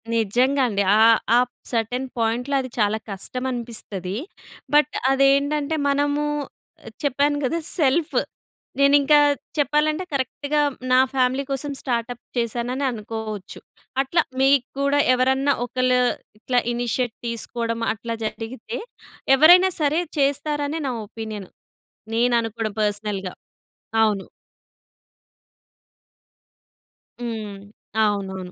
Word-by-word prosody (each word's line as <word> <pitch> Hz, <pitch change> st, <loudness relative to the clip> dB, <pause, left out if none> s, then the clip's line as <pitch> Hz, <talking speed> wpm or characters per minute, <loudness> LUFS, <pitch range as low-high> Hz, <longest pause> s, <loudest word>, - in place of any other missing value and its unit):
నిజంగా 245 Hz, +6 st, +2 dB
అండి. 200 Hz, -2 st, 0 dB, 0.2 s
ఆ -, -, +5 dB, 0.4 s
ఆప్ 245 Hz, 0 st, +1 dB, 0.2 s
సెర్టైన్ 245 Hz, +3 st, -1 dB
పాయింట్‌లో 240 Hz, +5 st, 0 dB
అది 255 Hz, -, -7 dB
చాలా 210 Hz, 0 st, +2 dB
కష్టం 200 Hz, +6 st, -3 dB
అనిపిస్తది. 215 Hz, -5 st, -4 dB, 0.6 s
బట్ 300 Hz, 0 st, +4 dB, 0.2 s
అదేంటంటే 280 Hz, +3 st, +2 dB
మనము 290 Hz, +1 st, +1 dB, 0.8 s
చెప్పాను 285 Hz, +1 st, +1 dB
గదా! 330 Hz, +6 st, 0 dB, 0.2 s
సెల్ఫ్. 300 Hz, +2 st, +2 dB, 0.7 s
నేనింకా 285 Hz, +1 st, +5 dB, 0.4 s
చెప్పాలంటే 300 Hz, +3 st, +1 dB
కరెక్ట్‌గా 285 Hz, +2 st, -1 dB, 0.3 s
నా 255 Hz, -, +6 dB
ఫ్యామిలీ 260 Hz, +1 st, +2 dB
కోసం 275 Hz, +1 st, -2 dB
స్టార్టప్ 240 Hz, -1 st, -3 dB
చేశాననే 240 Hz, +3 st, -1 dB
అనుకోవచ్చు. 215 Hz, -2 st, -6 dB, 0.4 s
అట్లా 335 Hz, +5 st, +1 dB, 0.2 s
మీకు 270 Hz, -1 st, +4 dB
కూడా 280 Hz, +1 st, +2 dB, 0.2 s
ఎవరన్నా 265 Hz, +2 st, +2 dB
ఒకళ్ళు 255 Hz, +1 st, +1 dB, 0.4 s
ఇట్లా 245 Hz, +2 st, +1 dB
ఇనిషియేట్ 240 Hz, 0 st, -1 dB
తీసుకోవడం 230 Hz, 0 st, -3 dB
అట్లా 230 Hz, +1 st, -5 dB
జరిగితే 225 Hz, +1 st, -5 dB, 0.6 s
ఎవరైనా 355 Hz, +6 st, +7 dB
సరే 305 Hz, +2 st, +2 dB, 0.2 s
చేస్తారని 290 Hz, +2 st, 0 dB
నా -, -, -1 dB
ఒపీనియన్. 215 Hz, -3 st, -7 dB, 0.7 s
నేను 240 Hz, +1 st, +3 dB
అనుకోవడం 225 Hz, -1 st, -4 dB
పర్సనల్‌గా. 205 Hz, -3 st, -2 dB, 0.7 s
అవును. 210 Hz, -3 st, 0 dB, 2.9 s
హ్మ్. 220 Hz, -4 st, -5 dB, 0.5 s
అవునవును. 190 Hz, -3 st, -2 dB
250 Hz, 95 wpm, -23 LUFS, 225-280 Hz, 2.9 s, ఎవరైనా